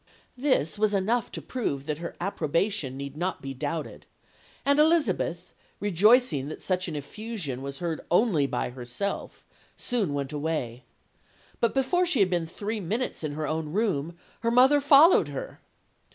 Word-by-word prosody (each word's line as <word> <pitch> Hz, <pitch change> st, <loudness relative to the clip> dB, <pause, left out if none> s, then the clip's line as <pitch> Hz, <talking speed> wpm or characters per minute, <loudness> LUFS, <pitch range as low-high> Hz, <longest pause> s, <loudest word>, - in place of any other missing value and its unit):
"This 245 Hz, -, +1 dB
was 210 Hz, -1 st, +2 dB
enough 220 Hz, +5 st, 0 dB
to -, -, -6 dB
prove 140 Hz, -, -3 dB
that 150 Hz, 0 st, -3 dB
her 170 Hz, -, -6 dB
approbation 165 Hz, -4 st, -1 dB
need 140 Hz, 0 st, -6 dB
not 180 Hz, +4 st, -2 dB
be 135 Hz, 0 st, -6 dB
doubted; 155 Hz, +4 st, -5 dB, 0.6 s
and 280 Hz, +1 st, +3 dB
Elizabeth, 235 Hz, -, +1 dB, 0.3 s
rejoicing 205 Hz, -, +3 dB
that 155 Hz, -, -8 dB
such 185 Hz, -1 st, 0 dB
an 160 Hz, -, -4 dB
effusion 155 Hz, -, -5 dB
was 140 Hz, 0 st, -6 dB
heard 165 Hz, -1 st, -3 dB
only 175 Hz, -, +3 dB
by 125 Hz, -, -2 dB
herself, 125 Hz, +11 st, -5 dB, 0.3 s
soon 210 Hz, -, -1 dB
went 140 Hz, +1 st, -3 dB
away. 145 Hz, -6 st, -3 dB, 0.7 s
But 235 Hz, -, +1 dB
before 355 Hz, +7 st, +2 dB
she 310 Hz, -8 st, +2 dB
had 190 Hz, -2 st, +3 dB
been 170 Hz, -2 st, 0 dB
three 210 Hz, +6 st, -4 dB
minutes 210 Hz, +2 st, -3 dB
in 150 Hz, -2 st, -3 dB
her 155 Hz, +1 st, -3 dB
own 155 Hz, 0 st, -3 dB
room, 175 Hz, -6 st, -1 dB, 0.2 s
her 230 Hz, -, 0 dB
mother 260 Hz, +5 st, +5 dB
followed 290 Hz, +4 st, +7 dB
her. -, -, -7 dB
180 Hz, 155 wpm, -27 LUFS, 150-230 Hz, 0.7 s, followed